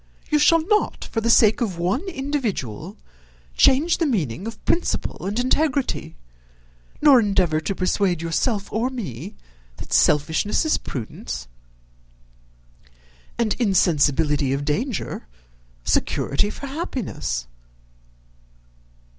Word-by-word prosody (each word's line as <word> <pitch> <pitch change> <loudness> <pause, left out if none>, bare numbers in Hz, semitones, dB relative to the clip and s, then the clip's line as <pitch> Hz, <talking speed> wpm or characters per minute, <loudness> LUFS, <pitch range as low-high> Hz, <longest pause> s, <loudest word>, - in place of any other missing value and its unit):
You 300 - +4
shall 315 +2 +4
not, 425 0 +1
for 225 - -1
the 230 - 0
sake 225 -1 +5
of 195 -7 -1
one 180 - 0
individual, 265 - -3 0.6
change 300 +6 +4
the 330 - +2
meaning 180 - -2
of 225 -2 -9
principle 340 - -1
and 205 +4 -1
integrity, 265 - 0 0.9
nor 285 -4 +8
endeavour 190 -7 +2
to 195 - -3
persuade 185 -1 +1
yourself 200 +6 -1
or 230 +4 0
me, 195 - -6 0.4
that - - -7
selfishness 160 - +2
is 315 - +2
prudence, 110 - -6 1.9
and 225 -3 +1
insensibility 150 - +2
of 140 +1 -2
danger 210 - -2 0.6
security 140 - 0
for 280 - -8
happiness." 265 - -4
210 Hz, 105 wpm, -22 LUFS, 160-265 Hz, 1.9 s, nor